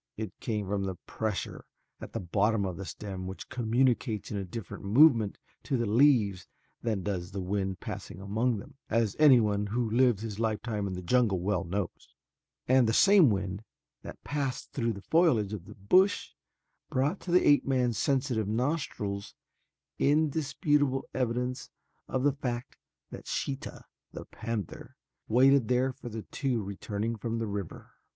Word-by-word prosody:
It 110 Hz, -3 st, -5 dB
came 105 Hz, -3 st, -2 dB
from 95 Hz, -1 st, -2 dB
pressure 110 Hz, -3 st, -3 dB, 0.4 s
at -, -, -9 dB
the -, -, -2 dB
bottom 100 Hz, +3 st, +1 dB
of 90 Hz, -2 st, -3 dB
the 95 Hz, -, -6 dB
stem 95 Hz, -2 st, -6 dB
which 95 Hz, -, -8 dB
communicates 120 Hz, -2 st, 0 dB
a 100 Hz, -2 st, -2 dB
different 95 Hz, +1 st, -7 dB
movement 115 Hz, -1 st, +5 dB, 0.3 s
to 135 Hz, -, 0 dB
the 120 Hz, -, 0 dB
leaves 105 Hz, -6 st, +3 dB, 0.3 s
than 110 Hz, -5 st, -1 dB
does 90 Hz, -3 st, -3 dB
the 100 Hz, 0 st, -5 dB
wind 95 Hz, 0 st, -2 dB
passing -, -, -7 dB
among 110 Hz, +5 st, 0 dB
them, 100 Hz, -, -11 dB
as 110 Hz, -3 st, +1 dB
anyone 110 Hz, -9 st, +5 dB
who 115 Hz, +2 st, -1 dB
has 115 Hz, -, -1 dB
lived 120 Hz, -6 st, +4 dB
his 110 Hz, -2 st, -5 dB
lifetime 110 Hz, -2 st, -1 dB
in 95 Hz, -, -4 dB
the 90 Hz, 0 st, -6 dB
jungle 110 Hz, -1 st, +2 dB
well 95 Hz, 0 st, 0 dB
knows, 95 Hz, +1 st, -5 dB, 0.5 s
and 130 Hz, -2 st, +5 dB
the 110 Hz, -, +1 dB
same 195 Hz, -, +6 dB
wind 100 Hz, 0 st, -2 dB, 0.4 s
that -, -, -10 dB
passed 140 Hz, -3 st, -3 dB
through 115 Hz, -4 st, -1 dB
the 100 Hz, -1 st, -10 dB
foliage 130 Hz, -, +3 dB
of 95 Hz, -4 st, -6 dB
the 105 Hz, -, -12 dB
bush 185 Hz, -, +3 dB, 0.6 s
brought 140 Hz, +9 st, 0 dB
to -, -, -9 dB
the 180 Hz, +1 st, +4 dB
ape 145 Hz, -1 st, +5 dB
man's 125 Hz, -4 st, +1 dB
sensitive 130 Hz, -6 st, 0 dB
nostrils 110 Hz, -5 st, -2 dB, 0.6 s
indisputable 145 Hz, -2 st, +1 dB
evidence 125 Hz, 0 st, -2 dB, 0.4 s
of 130 Hz, -, -1 dB
the 145 Hz, -1 st, +3 dB
fact 125 Hz, -3 st, -4 dB, 0.4 s
that -, -, -9 dB
Sheeta, 135 Hz, -1 st, -4 dB, 0.3 s
the -, -, -7 dB
panther, 110 Hz, -6 st, -6 dB, 0.3 s
waited 130 Hz, +1 st, +5 dB
there 125 Hz, +1 st, +1 dB
for 125 Hz, -1 st, -9 dB
the 110 Hz, -1 st, -6 dB
two 130 Hz, -6 st, -2 dB
returning 105 Hz, +3 st, -3 dB
from 115 Hz, +2 st, -3 dB
the 115 Hz, -, -1 dB
river. 100 Hz, -4 st, -6 dB
115 Hz, 160 wpm, -29 LUFS, 100-130 Hz, 0.6 s, same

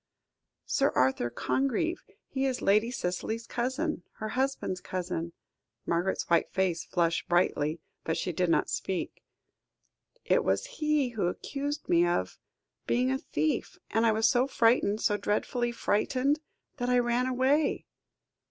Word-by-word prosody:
"Sir -, -, +2 dB
Arthur 130 Hz, -1 st, +2 dB
Congreve. 275 Hz, -, 0 dB, 0.3 s
He 270 Hz, 0 st, -1 dB
is 255 Hz, -2 st, -1 dB
Lady 210 Hz, +4 st, +4 dB
Cicely's 225 Hz, +1 st, -3 dB
cousin 260 Hz, -, -2 dB
her 215 Hz, -, -5 dB
husband's 260 Hz, -8 st, -1 dB
cousin." 175 Hz, -2 st, -3 dB, 0.5 s
Margaret's 175 Hz, +3 st, 0 dB
white 170 Hz, -, +3 dB
face 185 Hz, -3 st, 0 dB
flushed 170 Hz, -2 st, 0 dB
brightly, 165 Hz, -3 st, +1 dB, 0.2 s
but 160 Hz, -, -1 dB
she 180 Hz, -, -1 dB
did 180 Hz, +2 st, +1 dB
not -, -, +3 dB
speak. 190 Hz, -2 st, -3 dB, 1.0 s
"It -, -, +3 dB
was -, -, +1 dB, 0.2 s
he 300 Hz, -4 st, +2 dB
who 220 Hz, -7 st, -1 dB
accused 285 Hz, +10 st, -4 dB
me 170 Hz, 0 st, +4 dB
of 90 Hz, -, -1 dB, 0.5 s
being 125 Hz, +2 st, +2 dB
a 130 Hz, -, 0 dB
thief; 155 Hz, +1 st, -1 dB
and 225 Hz, +2 st, +2 dB
I -, -, +5 dB
was 220 Hz, +1 st, +3 dB
so 250 Hz, +1 st, +3 dB
frightened, 225 Hz, -4 st, +3 dB
so 205 Hz, -, +2 dB
dreadfully 240 Hz, +4 st, -1 dB
frightened, 255 Hz, +6 st, +1 dB, 0.4 s
that 245 Hz, -2 st, -1 dB
I 250 Hz, -, +4 dB
ran 245 Hz, +1 st, +2 dB
away." 265 Hz, +4 st, +2 dB
220 Hz, 140 wpm, -29 LUFS, 175-260 Hz, 1.0 s, I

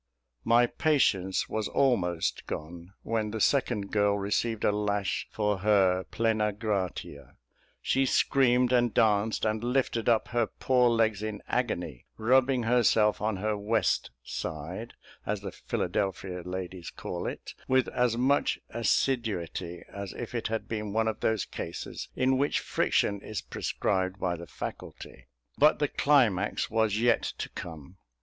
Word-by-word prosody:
My 120 Hz, +1 st, +5 dB
patience 110 Hz, -10 st, +1 dB
was 110 Hz, -1 st, -2 dB
almost 90 Hz, -11 st, 0 dB
gone 85 Hz, +4 st, -7 dB
when 110 Hz, -1 st, -1 dB
the 110 Hz, +1 st, -4 dB
second 110 Hz, -5 st, +1 dB
girl 105 Hz, -1 st, +2 dB
received 105 Hz, +3 st, -1 dB
a -, -, +4 dB
lash 105 Hz, -1 st, -1 dB
for 105 Hz, -2 st, -1 dB
her 95 Hz, -2 st, +3 dB
"Plena 110 Hz, -2 st, 0 dB
Gratia." 95 Hz, -, -4 dB, 0.5 s
She 135 Hz, 0 st, +2 dB
screamed, 125 Hz, -2 st, +3 dB
and 120 Hz, -1 st, +3 dB
danced, 110 Hz, 0 st, +2 dB
and 110 Hz, +1 st, 0 dB
lifted 125 Hz, -2 st, 0 dB
up 115 Hz, -2 st, +2 dB
her 120 Hz, -2 st, +1 dB
poor 125 Hz, -2 st, +2 dB
legs 110 Hz, -3 st, +2 dB
in 110 Hz, -1 st, -5 dB
agony, 90 Hz, -, -2 dB
rubbing 125 Hz, +2 st, +3 dB
herself 115 Hz, -2 st, +3 dB
on 110 Hz, 0 st, 0 dB
her 105 Hz, +2 st, -1 dB
"west" 105 Hz, 0 st, 0 dB
side, 85 Hz, -, -5 dB, 0.3 s
as 105 Hz, -1 st, -2 dB
the 100 Hz, -2 st, -5 dB
Philadelphia 95 Hz, -1 st, -2 dB
ladies 90 Hz, -1 st, -6 dB
call -, -, -5 dB
it, -, -, -6 dB
with 130 Hz, -1 st, +3 dB
as 125 Hz, -2 st, +1 dB
much 135 Hz, +4 st, +2 dB
assiduity 110 Hz, -8 st, -1 dB
as 100 Hz, -1 st, -7 dB
if 120 Hz, -, -7 dB
it 120 Hz, -, -2 dB
had 115 Hz, 0 st, -3 dB
been 105 Hz, -2 st, -4 dB
one 110 Hz, 0 st, +1 dB
of 110 Hz, -, -2 dB
those 110 Hz, -3 st, 0 dB
cases -, -, -6 dB
in 130 Hz, 0 st, +2 dB
which 145 Hz, +1 st, +1 dB
friction 100 Hz, -1 st, 0 dB
is 110 Hz, -2 st, -5 dB
prescribed 95 Hz, 0 st, -2 dB
by 90 Hz, -1 st, 0 dB
the 85 Hz, 0 st, -9 dB
faculty. 65 Hz, 0 st, -8 dB, 0.3 s
But 150 Hz, +2 st, +6 dB
the 145 Hz, -, +1 dB
climax 115 Hz, -11 st, +2 dB
was 110 Hz, -2 st, +2 dB
yet 120 Hz, 0 st, +3 dB, 0.2 s
to -, -, -4 dB
come. 80 Hz, +1 st, -9 dB
110 Hz, 145 wpm, -28 LUFS, 95-120 Hz, 0.5 s, But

